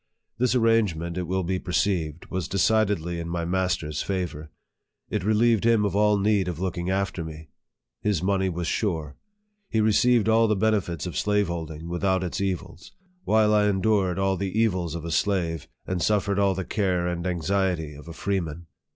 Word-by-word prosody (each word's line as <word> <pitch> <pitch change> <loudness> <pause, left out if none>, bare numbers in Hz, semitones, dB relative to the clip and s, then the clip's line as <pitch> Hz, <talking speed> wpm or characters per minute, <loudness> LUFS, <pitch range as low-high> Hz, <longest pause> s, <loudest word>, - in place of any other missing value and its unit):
This 125 0 +2
arrangement, 105 -8 +2
it 90 -2 -3
will 95 +1 0
be 90 +2 -1
perceived, 85 -2 -1
was 95 -2 -2
decidedly 100 -4 +1
in 85 0 -5
my 85 0 -2
master's 85 -4 -1
favor. 90 -5 -3 0.6
It 105 -4 -1
relieved 110 +2 +3
him 115 -2 +4
of 100 - -1
all 105 0 +4
need 100 -2 +2
of 85 -3 -4
looking 90 -1 -2
after 95 -2 -1
me. 80 -1 -9 0.5
His 100 -5 0
money 95 0 +1
was 85 -1 -3
sure. 80 -7 -2 0.5
He 110 - 0
received 110 +1 +3
all 115 0 +4
the 105 - +2
benefits 100 -5 0
of 90 - -5
slaveholding 85 -6 -1
without 95 +2 0
its 90 +1 -3
evils; 95 -3 -4 0.3
while 110 0 +4
I 105 -1 +4
endured 95 -2 +1
all 95 0 +1
the 100 +3 -2
evils 90 -7 +1
of 85 -1 -6
a 85 - -4
slave, 85 -1 0 0.2
and 90 -2 -2
suffered 100 0 +1
all 100 -1 +3
the 95 -1 -3
care 90 -4 0
and 85 0 -2
anxiety 90 -2 -1
of 75 +3 -12
a 85 - -7
freeman. 85 -3 -3
95 Hz, 175 wpm, -25 LUFS, 85-105 Hz, 0.6 s, him